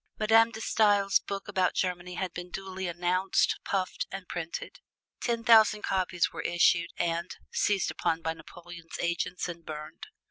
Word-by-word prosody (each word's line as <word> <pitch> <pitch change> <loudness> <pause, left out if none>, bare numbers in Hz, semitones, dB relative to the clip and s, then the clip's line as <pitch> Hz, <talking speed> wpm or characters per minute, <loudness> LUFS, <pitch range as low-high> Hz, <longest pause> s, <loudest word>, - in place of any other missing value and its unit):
Madame 225 +1 +5
De 220 -1 -8
Stael's 205 -3 +3
book 200 +1 -6
about 190 -3 +1
Germany 180 -1 -2
had 180 -1 -3
been 175 0 -7
duly 190 0 -5
announced, 180 +2 +1
puffed, 190 -2 -2 0.2
printed. 170 -1 -5 0.4
Ten 235 -2 -1
thousand 220 -3 +6
copies 185 -2 0
were - - -4
issued 170 0 +3
and 170 +1 -1 0.2
seized 200 -3 +1
upon 165 0 -1
by 160 -1 -1
Napoleon's 170 0 -11
agents 175 +1 -1
and 170 -1 -7
burned. 155 -1 -8
180 Hz, 145 wpm, -29 LUFS, 170-200 Hz, 0.4 s, thousand